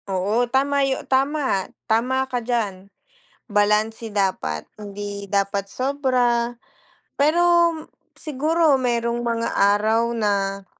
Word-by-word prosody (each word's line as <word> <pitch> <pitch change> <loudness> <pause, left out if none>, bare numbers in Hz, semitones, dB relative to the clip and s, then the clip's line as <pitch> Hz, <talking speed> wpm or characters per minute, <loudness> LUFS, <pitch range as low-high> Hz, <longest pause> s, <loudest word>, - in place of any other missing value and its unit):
Oo, 205 +6 0
tama 280 +2 +1
yo 270 -1 -1
tama, 270 -6 0 0.2
tama 255 +4 +1
ka 250 -2 -3
diyan. 210 -5 -3 0.6
Balanse 210 +2 +1
dapat 185 - -1
hindi 205 -1 -7
dapat 200 0 -1
sobra, 250 -1 0 0.6
pero 340 +3 +4 0.5
siguro 305 0 +1
mayrong 235 -1 0
mga 230 -1 -1 0.3
araw 220 +2 +1
na 200 -2 -1
235 Hz, 100 wpm, -22 LUFS, 205-265 Hz, 0.6 s, pero